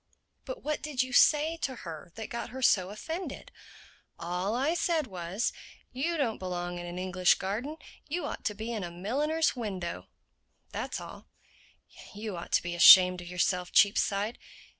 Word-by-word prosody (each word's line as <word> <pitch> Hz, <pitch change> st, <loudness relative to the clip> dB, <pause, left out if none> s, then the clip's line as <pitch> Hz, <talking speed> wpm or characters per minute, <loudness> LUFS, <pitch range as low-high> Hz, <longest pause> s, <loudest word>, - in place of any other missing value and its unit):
"But -, -, -7 dB
what 305 Hz, 0 st, -2 dB
did 285 Hz, -4 st, -1 dB
you 255 Hz, -1 st, -8 dB
say 310 Hz, +5 st, +4 dB
to 265 Hz, -5 st, -3 dB
her 165 Hz, 0 st, -8 dB
that 220 Hz, -1 st, -7 dB
got 235 Hz, -, -4 dB
her 260 Hz, +1 st, -7 dB
so 185 Hz, -5 st, +4 dB
offended?" 320 Hz, -, -6 dB, 0.7 s
"All 180 Hz, +5 st, -2 dB
I 275 Hz, +6 st, +1 dB
said 335 Hz, -3 st, 0 dB
was, 185 Hz, +2 st, -3 dB, 0.4 s
'You 325 Hz, +7 st, -1 dB
don't 240 Hz, -7 st, -1 dB
belong 175 Hz, -1 st, -4 dB
in 175 Hz, -, -6 dB
an 175 Hz, +1 st, -6 dB
English 185 Hz, -1 st, +3 dB
garden; 230 Hz, +11 st, -4 dB, 0.3 s
you 340 Hz, +4 st, -3 dB
ought -, -, -5 dB
to 210 Hz, -, -1 dB
be 220 Hz, +3 st, -5 dB
in 215 Hz, -4 st, -3 dB
a 175 Hz, -, -4 dB
milliner's 280 Hz, -, 0 dB
window.' 190 Hz, -8 st, -5 dB, 0.6 s
That's -, -, -4 dB
all." -, -, -11 dB, 0.9 s
"You 210 Hz, -1 st, -5 dB
ought 170 Hz, -, -8 dB
to -, -, +3 dB
be 175 Hz, 0 st, -4 dB
ashamed 180 Hz, +1 st, +8 dB
of 175 Hz, -, -10 dB
yourself, 180 Hz, 0 st, -1 dB
Cheapside. 205 Hz, +2 st, +3 dB
210 Hz, 165 wpm, -29 LUFS, 180-275 Hz, 0.9 s, ashamed